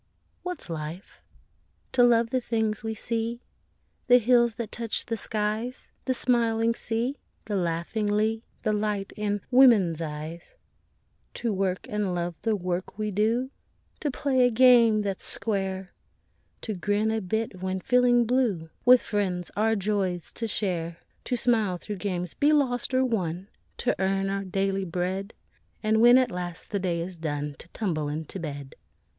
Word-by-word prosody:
What's 360 -2 -5
life? 165 +2 -7 0.7
To 250 - +3
love 235 -1 +4
the 255 - +1
things 220 -3 -1
we 220 0 -3
see; 230 +2 -3 0.6
The 245 0 +8
hills 240 -1 +3
that 225 -2 -5
touch 230 -2 -2
the 230 - -2
skies; 220 +3 -3
The 260 - +1
smiling 230 -2 +2
sea; 235 +5 -2 0.3
the 210 - -2
laughing 175 +4 -1
lea; 215 +2 +1 0.2
The 215 - +1
light 210 -2 -2
in 205 -1 -1
woman's 220 - +5
eyes; 160 - -6 0.8
To 230 -3 -1
work 190 -1 -1
and 205 -4 -1
love 175 0 -2
the 225 -2 +1
work 180 0 -3
we 215 -1 -2
do; 225 +6 +1 0.5
To 295 - -1
play 260 -1 +1
a 245 - +5
game 235 -3 +6
that's 195 -2 -3
square; 190 -3 -2 0.7
To 220 - -3
grin 205 +3 0
a 220 0 -1
bit 210 -1 -3
when 190 0 -2
feeling 245 +2 +4
blue; 220 -10 0
With 250 0 +7
friends 185 -4 -2
our 225 +2 +2
joys 195 -4 -1
to 230 - -3
share; 170 -6 -2 0.3
To 245 - -1
smile, 220 -7 +1
though 210 - -2
games 180 -3 -3
be 290 +1 +3
lost 260 -4 +1
or 260 0 +4
won; 190 -5 -2 0.3
To 250 - 0
earn 195 0 +1
our 195 0 -2
daily 195 +1 -1
bread; 185 +3 -3 0.5
And 220 +1 +3
when 240 +2 +8
at 255 -2 +2
last 175 -1 -6
the 200 - 0
day 175 -3 -1
is 175 +1 -6
done 150 -2 -3
To - - -11
tumble 160 -7 -2
into 155 +5 -5
bed. 145 -4 -6
210 Hz, 160 wpm, -27 LUFS, 185-235 Hz, 0.8 s, The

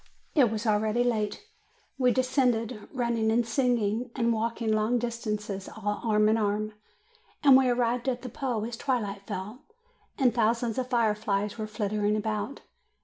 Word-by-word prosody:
It 265 -7 +5
was 220 +1 -3
already 215 +2 +2
late. 220 - -1 0.6
We 250 -1 +4
descended, 245 -3 0
running 235 -3 0
and 235 +1 +2
singing, 240 -2 +1
and 235 -2 +2
walking 225 0 -1
long 215 +3 +2
distances 210 -4 -3
all 205 +1 -3
arm 215 -2 +3
in 220 +1 +3
arm, 215 0 -1 0.7
and 275 -3 +8
we 260 -1 +5
arrived 245 +1 +1
at 250 -1 -3
the 250 - -5
Po 240 -3 -2
as 235 0 -5
twilight 210 -7 -2
fell, 210 +8 -6 0.6
and 255 -4 +3
thousands 230 0 +1
of 255 0 -3
fireflies 210 -3 0
were 215 - -3
flitting 210 0 0
about. 215 +3 -3
225 Hz, 150 wpm, -28 LUFS, 210-245 Hz, 0.7 s, and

